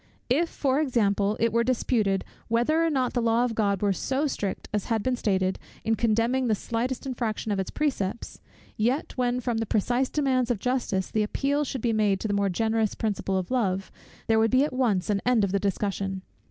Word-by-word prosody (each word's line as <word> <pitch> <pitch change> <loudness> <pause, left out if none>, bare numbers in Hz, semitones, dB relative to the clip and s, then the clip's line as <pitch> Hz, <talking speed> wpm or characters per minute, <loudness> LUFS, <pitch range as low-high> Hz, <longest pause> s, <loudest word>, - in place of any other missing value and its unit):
If, 330 +6 +3
for 270 0 0
example, 210 -6 +1
it 230 -1 +1
were 235 0 +3
disputed, 225 -5 +1 0.2
whether 240 +8 +2
or 330 - +2
not 260 -5 0
the 245 - +1
law 230 +1 +3
of 240 - -2
God 205 -3 0
were 200 -1 +3
so 265 - -1
strict 205 -9 -3
as 210 -2 -1
had 225 -3 0
been 255 -1 +1
stated, 190 -5 0 0.2
in 225 - +1
condemning 230 +3 +1
the 220 - +3
slightest 240 +5 -3
infraction 230 -4 -2
of 200 - 0
its 190 - -2
precepts; 235 -8 -2 0.3
yet, 245 +8 0
when, 250 -1 0
from 240 -2 -1
the 225 - -2
precise 245 +6 +1
demands 260 -4 +1
of 240 - +1
justice, 235 -5 -1
the 215 - +1
appeal 280 +7 0
should 265 -3 -4
be 230 -1 +1
made 205 -3 +2
to - - -2
the 205 - -1
more 200 -1 +1
generous 220 +2 0
principle 200 -3 -1
of 185 +3 -3
love, 195 -7 0 0.3
there 225 0 +3
would 225 0 +3
be 255 +3 +4
at 295 - -2
once 215 -7 +1
an 200 -1 0
end 245 -3 +3
of 195 - 0
the 200 - +1
discussion. 195 -1 -2
225 Hz, 210 wpm, -26 LUFS, 200-255 Hz, 0.3 s, be